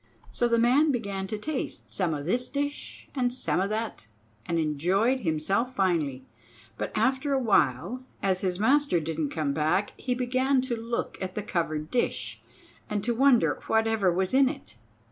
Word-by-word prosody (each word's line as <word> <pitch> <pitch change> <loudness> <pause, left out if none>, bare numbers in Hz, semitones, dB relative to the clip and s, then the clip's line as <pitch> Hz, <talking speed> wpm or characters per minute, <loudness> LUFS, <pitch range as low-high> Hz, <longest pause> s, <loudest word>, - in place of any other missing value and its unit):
So 240 - +1
the 235 0 +2
man 260 +7 +4
began 200 -6 -3
to 215 - -3
taste 285 +5 -4
some 175 -5 0
o' 145 - -5
this 240 +11 0
dish 285 +1 -4
and 250 -3 +1
some 245 -7 -1
o' 195 - +1
that, 215 - -4 0.4
and 170 - 0
enjoyed 180 - +1
himself 195 +8 0
finely. 160 -9 0 0.5
But - - -4
after 265 +2 +1
a 270 - +3
while, 205 - +1 0.2
as 190 -2 +1
his 185 -2 -1
master 265 -2 +3
didn't 155 -1 -2
come 145 -2 -1
back, 160 +7 +1
he 250 -1 -1
began 255 +2 +1
to 255 -2 -2
look 230 +1 -4
at 185 -1 -4
the 210 - -3
covered 155 -5 -2
dish, 245 - -1 0.5
and 210 -1 -1
to 240 +2 +1
wonder 255 0 +3
whatever 220 -4 +2
was 185 +3 0
in 265 0 +5
it. 275 - -9
215 Hz, 170 wpm, -27 LUFS, 175-255 Hz, 0.5 s, in